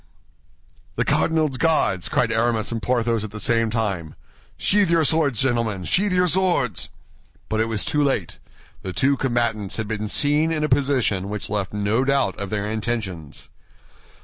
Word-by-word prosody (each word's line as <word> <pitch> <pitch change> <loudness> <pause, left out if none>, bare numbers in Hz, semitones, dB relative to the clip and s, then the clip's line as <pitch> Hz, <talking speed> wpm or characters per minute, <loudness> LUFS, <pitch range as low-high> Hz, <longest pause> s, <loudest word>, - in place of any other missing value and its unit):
"The - - 0
cardinal's 155 -5 +1
Guards!" 155 - +2
cried - - +1
Aramis 115 -1 0
and 115 -1 -3
Porthos 115 -3 0
at 110 - -5
the 105 +1 -8
same 115 0 +1
time. 100 -8 -2 0.4
"Sheathe 205 -1 +2
your 165 -2 +3
swords, 145 -7 +2
gentlemen, 115 -7 0
sheathe 190 - +1
your 180 0 +3
swords!" 175 - +1 0.6
But 110 - -1
it 110 - +2
was 110 -2 -2
too 150 - +1
late. 130 - -1 0.4
The 95 - -5
two 140 +8 +2
combatants 115 -6 -1
had 110 -1 -3
been 105 0 -3
seen 150 +7 +1
in 155 -1 0
a - - +2
position 130 -8 +1
which 105 -1 -5
left 100 -2 -2
no 105 +4 0
doubt 140 0 +1
of 100 -1 -4
their 105 -1 -2
intentions. 105 - -4
115 Hz, 165 wpm, -22 LUFS, 105-140 Hz, 0.6 s, your